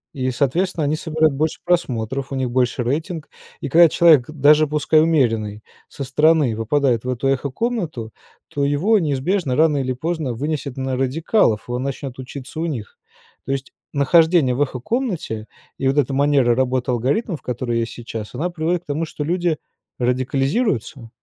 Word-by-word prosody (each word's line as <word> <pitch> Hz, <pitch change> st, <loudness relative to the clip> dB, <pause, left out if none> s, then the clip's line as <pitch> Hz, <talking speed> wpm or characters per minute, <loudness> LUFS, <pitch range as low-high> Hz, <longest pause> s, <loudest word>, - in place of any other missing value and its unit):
И, 130 Hz, -1 st, -1 dB
соответственно, 160 Hz, +7 st, 0 dB
они 145 Hz, +1 st, +1 dB
собирают 155 Hz, -1 st, +1 dB
больше 155 Hz, +3 st, -1 dB
просмотров, 135 Hz, -6 st, -1 dB
у -, -, -2 dB
них 130 Hz, -2 st, -1 dB
больше 125 Hz, 0 st, +1 dB
рейтинг, 155 Hz, +6 st, -3 dB, 0.3 s
и -, -, -3 dB
когда 170 Hz, +4 st, +7 dB
человек, 155 Hz, -6 st, +5 dB
даже 150 Hz, +1 st, +4 dB
пускай 150 Hz, +1 st, +3 dB
умеренный 115 Hz, -10 st, +1 dB, 0.2 s
со 140 Hz, -, -7 dB
стороны, 145 Hz, -2 st, +3 dB
выпадает 120 Hz, +1 st, +1 dB
в 125 Hz, -, -4 dB
эту 125 Hz, +1 st, -1 dB
эхо-комнату, 140 Hz, -, -2 dB, 0.4 s
то 140 Hz, -, -3 dB
его 165 Hz, +10 st, +3 dB
неизбежно 145 Hz, -1 st, 0 dB
рано 155 Hz, -1 st, +3 dB
или 130 Hz, -2 st, -1 dB
поздно 155 Hz, -1 st, -3 dB
вынесет 140 Hz, +1 st, -3 dB
на 130 Hz, -1 st, -2 dB
радикалов, 135 Hz, -, +1 dB
он 125 Hz, +1 st, -3 dB
начнет 135 Hz, -1 st, -5 dB
учиться 130 Hz, +3 st, -8 dB
у 170 Hz, -, -1 dB
них. 115 Hz, -9 st, -6 dB, 0.5 s
То 135 Hz, -, 0 dB
есть 135 Hz, 0 st, -5 dB, 0.2 s
нахождение 160 Hz, 0 st, +4 dB
в 130 Hz, -, -2 dB
эхо-комнате 145 Hz, -, -2 dB, 0.3 s
и 135 Hz, -, 0 dB
вот 135 Hz, -, +1 dB
эта 140 Hz, -2 st, +2 dB
манера 140 Hz, -3 st, +3 dB
работы 130 Hz, 0 st, 0 dB
алгоритмов, 140 Hz, -, -1 dB
которые 120 Hz, -1 st, -2 dB
есть 115 Hz, -, -3 dB
сейчас, 115 Hz, -2 st, -7 dB
она 170 Hz, +8 st, -2 dB
приводит 170 Hz, +1 st, -1 dB
к -, -, -45 dB
тому, 150 Hz, +3 st, -2 dB
что 150 Hz, -, -5 dB
люди 175 Hz, 0 st, 0 dB, 0.4 s
радикализируются. 130 Hz, -, -1 dB
140 Hz, 160 wpm, -21 LUFS, 125-160 Hz, 0.5 s, когда